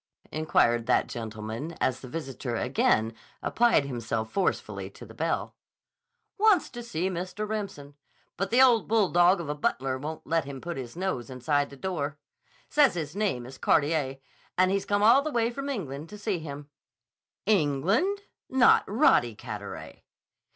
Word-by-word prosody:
inquired 120 -7 +2
that - - +3
gentleman 110 +6 -6
as 130 0 0
the 130 - -10
visitor 135 -4 -5
again 115 -2 +1 0.3
applied 235 -11 +3
himself 115 -4 -3
forcefully 195 - -1
to - - -12
the - - -13
bell. - - -2 0.8
"Wants 410 -6 +4
to 240 - -7
see 185 -6 -2
Mr. 185 +3 -4
Remsen. 200 -10 -5 0.4
But 195 0 -2
the 250 +3 +6
old 240 -4 +4
bulldog 190 -4 +4
of 170 - -5
a 150 - -1
butler 135 -3 -1
won't 155 +3 -6
let 165 -2 +1
him 140 -1 -7
put 170 +4 -5
his 125 -3 -7
nose 175 -10 -3
inside 145 +3 0
the 140 - -12
door. 150 -3 -3 0.5
Says 290 -9 +4
his 155 -1 -4
name 195 - -1
is 130 +1 -11
Carteret, 145 -3 +1 0.4
and 185 +1 +4
he's 195 0 -1
come 205 0 +2
all 235 +6 +7
the 310 - -3
way 235 -4 +1
from 275 +3 -5
England 155 - -5
to 210 - -9
see 205 -3 -2
him." 145 -2 -8 0.7
"England? 200 - +2 0.3
Not 260 -1 +5
Roddy 195 - +3
Carteret!" 105 -3 -8
160 Hz, 160 wpm, -28 LUFS, 135-210 Hz, 0.8 s, all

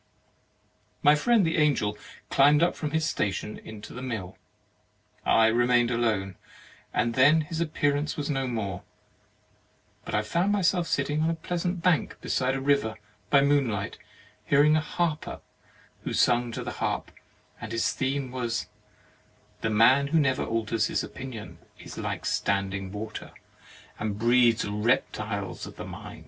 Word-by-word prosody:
My 145 - +7
friend 210 +6 +3
the 160 - 0
Angel 140 -9 +2 0.4
climbed 145 +3 +5
up 175 - +2
from 150 - -3
his 160 +1 0
station 105 +1 -2
into 110 -1 -10
the 125 - -7
mill. 110 -8 -5 0.9
I 110 - +5
remained 120 +1 +3
alone, 105 -6 0 0.5
and 115 - 0
then 150 +5 +5
this 165 0 -3
ap 170 - +1
pearance 145 +1 0
was 145 -1 -2
no 135 -3 -1
more; 105 -7 -3 1.2
but - - -4
I 105 - +1
found 175 - 0
myself 185 -3 +2
sitting 150 +1 0
on 160 - +2
a 165 - 0
pleasant 175 +1 -3
bank 180 -4 +1
beside 130 0 0
a - - -2
river 135 -5 +1 0.3
by 140 - +5
moonlight, 135 -8 +1 0.4
hearing 145 +6 +4
a 155 - +2
harper 160 0 -2 0.6
who - - -3
sung 120 -1 +2
to - - -4
the - - -4
harp; - - -2 0.5
and 115 -1 -6
his 115 0 +1
theme 135 -1 -2
was: 120 -3 -3 0.9
"The 115 - 0
man 125 +6 +5
who 160 +3 +2
never 135 -3 +1
alters 115 -1 0
his - - -1
opinion 125 -5 -8 0.2
is - - -9
like - - -4
standing 95 -1 -1
water, 105 +1 -7 0.7
and 105 -2 -2
breeds 120 0 +4
reptiles 105 -3 -1
of - - -11
the - - -7
mind." - - -9
125 Hz, 150 wpm, -27 LUFS, 110-150 Hz, 1.2 s, My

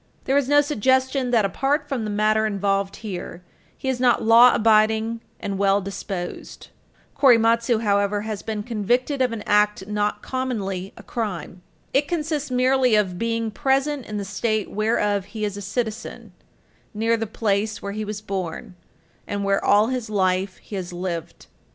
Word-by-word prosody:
There 270 - 0
is 280 -2 +2
no 290 0 +6
suggestion 260 -1 +1
that, 230 -4 +3
apart 280 - 0
from 265 -6 -2
the - - -3
matter 215 +1 +2
involved 200 -1 -1
here, 180 -3 -6 0.3
he - - -6
is 260 -2 0
not 245 -1 +3
law 230 +2 +7
abiding 220 +1 +3 0.2
and 195 -1 -4
well 200 0 +3
disposed. 195 -2 -6 0.5
Korematsu, 230 -2 +4
however, 200 0 +1
has 215 -2 -5
been 215 -2 -4
convicted 245 +5 0
of 250 -2 +2
an 225 -2 -5
act 210 -1 +2
not 210 0 -2
commonly 200 -8 -3
a - - -11
crime. 185 -6 -5 0.3
It 285 +2 +2
consists 305 -3 -2
merely 255 -1 +3
of 190 -4 0
being 230 -1 -1
present 270 +3 0
in 210 - -4
the 200 - -3
state 215 +2 -1
whereof 210 -2 0
he 215 +1 -4
is 205 -1 -3
a 205 - -6
citizen, 220 +3 -4 0.6
near 225 +2 +2
the 225 -1 -3
place 210 0 -1
where 200 - -5
he 215 +1 -4
was 210 0 -5
born, 190 -4 -5 0.5
and 200 0 -3
where 195 0 +1
all 210 +3 +4
his 250 -4 -3
life 190 -1 0
he 210 - -10
has 180 -1 -5
lived. 175 -2 -5
215 Hz, 165 wpm, -23 LUFS, 200-245 Hz, 0.6 s, law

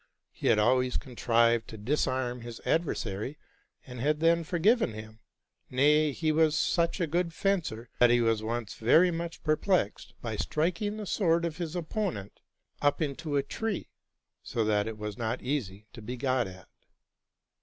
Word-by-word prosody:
He - - -4
had - - +5
always 125 +4 +3
con 125 -2 -10
trived 115 -1 +3
to 110 - -9
disarm 125 +1 -1
his 120 -1 -8
adversary, 130 - -1 0.5
and 125 -2 -9
had 150 +4 +1
then 165 +1 +3
forgiven 180 - +2
hin; 110 0 -10 0.5
nay, 150 +3 +4
he 155 +2 0
was 155 0 +3
such 170 +2 +1
a 175 - +2
good 165 +1 -1
fencer, 165 - -1
that 120 - +7
he 120 0 +4
was 115 -2 +2
once 115 0 -3
very 160 +11 +4
much 170 0 -5
perplexed 155 - 0
by 110 -3 -4
striking 180 - -1
the 215 - -5
sword 170 -4 +2
of 165 -2 -4
his 170 -2 -4
opponent 175 - -3 0.4
up 145 0 +2
into 150 0 -2
a - - +3
high - - -29
tree, 220 -4 -3 0.5
so 115 -2 -2
that 105 -1 +1
it 110 -1 -5
was 105 0 -6
not 115 +1 -2
easy 110 -7 -3
to 120 - -10
be 120 +4 -6
got 130 -2 +1
again. 95 -1 -11
135 Hz, 170 wpm, -29 LUFS, 115-165 Hz, 0.5 s, that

